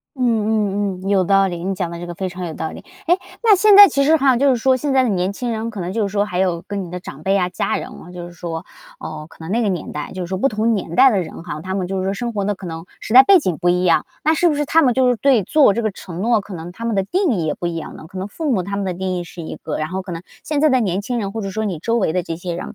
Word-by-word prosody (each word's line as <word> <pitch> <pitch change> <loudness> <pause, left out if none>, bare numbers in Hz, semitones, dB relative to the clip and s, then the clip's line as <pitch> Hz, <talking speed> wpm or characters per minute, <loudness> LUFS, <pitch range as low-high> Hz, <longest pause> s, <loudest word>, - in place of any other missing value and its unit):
嗯 260 - -4
嗯 210 -4 0
嗯， 195 - -5
有 195 -2 +3
道 195 +1 +4
理， 175 -2 -5
你 195 +1 -1
讲 180 -3 -3
的 170 - -7
这 175 - -6
个 175 - -6
非 190 +2 -3
常 180 0 -6
有 165 - -5
道 160 - -4
理。 - - -11 0.2
哎， 350 - +4 0.3
那 435 -4 +6
现 420 +1 +5
在 405 0 +11
其 280 -4 +1
实 310 +3 +4
哈， 270 -4 +3
就 280 +2 +3
是 255 - +3
说 260 +2 +3
现 285 +2 -2
在 265 -1 +4
的 250 - +1
年 185 -1 0
轻 245 +3 -4
人 225 0 -3
可 205 - -7
能 175 - -3
就 215 -3 +1
是 195 - -6
说 205 0 +1
还 180 -4 -4
有 180 -2 0
跟 200 -2 -3
你 170 - -9
的 180 +1 -5
长 - - -10
辈 195 - +1
呀、 185 -2 +2
家 - - -1
人 - - -6
哦 180 - -12
就 175 -1 -7
是 175 - -11
说， 165 0 -6 0.3
呃， 155 -1 -7
可 - - -18
能 160 +2 -7
那 230 +4 +1
个 205 - +1
年 175 -4 -4
代 150 -1 -6
就 185 - -5
是 - - -4
说 190 +2 -3
不 270 +8 +2
同 220 +1 +1
年 170 -4 -4
代 265 0 +7
的 195 -4 +1
人 165 - -9
哈， 155 -2 -6
他 190 0 -4
们 185 -2 -1
就 190 +1 -3
是 185 - -2
说 195 - 0
生 235 +2 -4
活 200 -1 -1
的 205 - 0
可 190 -1 -10
能 165 0 -6 0.2
时 220 - -4
代 260 - +11
背 390 +5 +6
景 185 - -1
不 175 -1 +1
一 180 +1 +1
样， 165 -3 +3 0.2
那 315 +2 +3
是 345 +2 +3
不 - - 0
是 295 0 -1
他 325 +3 +4
们 255 - +4
就 255 +1 +3
是 245 - +2
对 255 -2 +3
做 290 -6 +4
这 235 - -1
个 220 - 0
承 180 -2 -9
诺， 225 -1 +2
可 200 - -12
能 175 0 -7
他 230 +5 -8
们 230 -2 0
的 195 - +2
定 365 - +1
义 170 -6 -1
也 - - 0
不 175 - -4
一 170 - -2
样 165 - -7
了， 155 - -11
可 185 +2 -9
能 190 - -4
父 300 +5 -2
母 190 -6 +1
他 200 +2 -4
们 200 - -2
的 185 - -1
定 185 +1 -3
义 175 - -3
是 170 - -10
一 160 - -6
个， 155 - -5
然 155 0 -2
后 190 +3 -4
可 185 -2 -7
能 165 +1 -6 0.2
现 295 -2 -1
在 310 - +5
的 260 - +3
年 190 -3 0
轻 240 +4 -3
人， 195 -1 -4
或 225 - -4
者 195 -2 -4
说 220 +3 -2
你 190 -6 -3
周 230 +8 -1
围 190 -8 +1
的 180 0 0
这 165 -1 -5
些 175 0 -5
人， 175 - -6
195 Hz, 375 characters per minute, -20 LUFS, 175-235 Hz, 0.3 s, 在